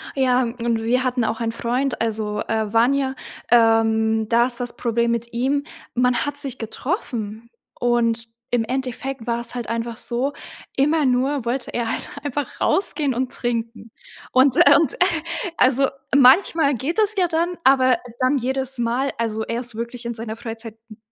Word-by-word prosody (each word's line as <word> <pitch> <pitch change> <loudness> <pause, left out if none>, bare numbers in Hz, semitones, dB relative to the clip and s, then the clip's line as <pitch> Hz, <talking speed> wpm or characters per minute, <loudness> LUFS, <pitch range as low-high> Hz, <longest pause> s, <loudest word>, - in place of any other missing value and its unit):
Ja 255 -1 +3
und 235 -1 -2
wir 250 +3 +1
hatten 250 -2 0
auch 225 - -1
ein 225 -1 -1
Freund, 245 +2 -2
also, 215 -2 -1
äh, 220 -2 -2
Vanja, 265 +3 +2 0.4
ähm, 225 -1 +3
da 235 +1 +4
ist 245 -1 -6
das 245 -1 -4
Problem 235 0 0
mit 235 0 -3
ihm: 270 +4 0 0.3
man 250 0 +2
hat 290 0 -3
sich 275 -3 0
getroffen 230 - -4 0.3
und 235 -1 +2 0.3
im 245 -2 +2
Endeffekt 260 0 -4
war 235 0 0
es 235 +1 -5
halt 245 -2 -5
einfach 230 0 -3
so, 255 +6 -1 0.4
immer 300 +3 +2
nur 260 +1 +1
wollte 245 +2 -2
er 235 -2 -2
halt - - -3
einfach 290 0 -4
rausgehen 300 -8 +1
und 250 +1 -2
trinken. 230 -2 -3 0.4
Und, 260 0 +4
äh 285 - +7
und, 305 -4 +2
äh, - - -15 0.6
also, 265 +1 +4 0.3
manchmal 285 +2 +5
geht 275 +7 -3
es 430 -1 +4
ja 370 -3 +2
dann, 340 +1 -1
aber 260 -2 +5 0.2
dann 260 +2 +2
jedes 265 0 -2
Mal, 245 +4 0
also, 220 -1 -1
er 230 +1 -3
ist 240 -2 -5
wirklich 235 +1 -6
in 235 0 -3
seiner 220 -1 -5
Freizeit 225 -1 -8
n 215 - -12
245 Hz, 170 wpm, -22 LUFS, 230-270 Hz, 0.6 s, äh